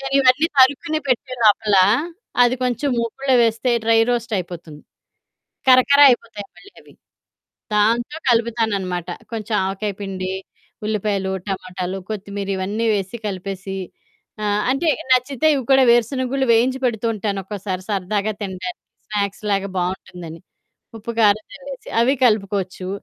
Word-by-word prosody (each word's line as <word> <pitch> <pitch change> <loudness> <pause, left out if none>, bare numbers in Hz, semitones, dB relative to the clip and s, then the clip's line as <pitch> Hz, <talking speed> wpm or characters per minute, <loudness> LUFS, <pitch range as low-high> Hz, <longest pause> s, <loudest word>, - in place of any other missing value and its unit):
నేనివన్నీ 270 +2 +3
తరుక్కుని 285 +4 +4
పెట్టే 255 +1 0
లోపలా, 210 -2 +5 0.6
అది 245 +1 +4
కొంచెం 250 +3 0
ముకుడులో 260 +4 -1
వేస్తే 230 +2 +1
డ్రై 225 0 +4
రోస్టయిపోతుంది. 180 -10 -4 0.9
కరకర 260 +2 +6
అయిపోతాయి 225 -5 -1
మళ్ళీ 400 - -16
అవి. - - -19 0.8
దాంతో 230 +7 +1
కలుపుతాననమాట. 220 -7 0 0.2
కొంచెం 220 -1 -3
ఆవకాయ 195 +2 -2
పిండి, 190 -2 -4 0.6
ఉల్లిపాయలు, 200 -2 -1 0.2
టమాటాలు, 185 -1 -4
కొత్తిమీరి, 200 -1 -4
ఇవన్నీ 210 +5 -2
వేసి 195 +3 -3
కలిపేసీ, 195 0 -5 0.7
ఆహ్, 205 0 +1
అంటే 275 +6 0 0.2
నచ్చితే 255 +3 +2
ఇవి 270 - -2
కూడా, 265 - +6
వేరుశనగుళ్ళు 260 +3 +1
వేయించి 255 +3 +2
పెడుతూ 235 -2 0
ఉంటానొక్కోసారి, 195 -2 -4
సరదాగా 205 +2 -1
తినడానికి. 195 - -6 0.3
స్నాక్స్‌లాగా 200 -1 -1
బావుంటుందని. 175 -2 -5 0.6
ఉప్పు, 220 +2 -6
కారం 215 0 +4
జల్లేసి, 275 -1 -10
అవి 250 +4 +3
కలుపుకోచ్చు, 195 -4 0
215 Hz, 110 wpm, -20 LUFS, 195-250 Hz, 0.9 s, కరకర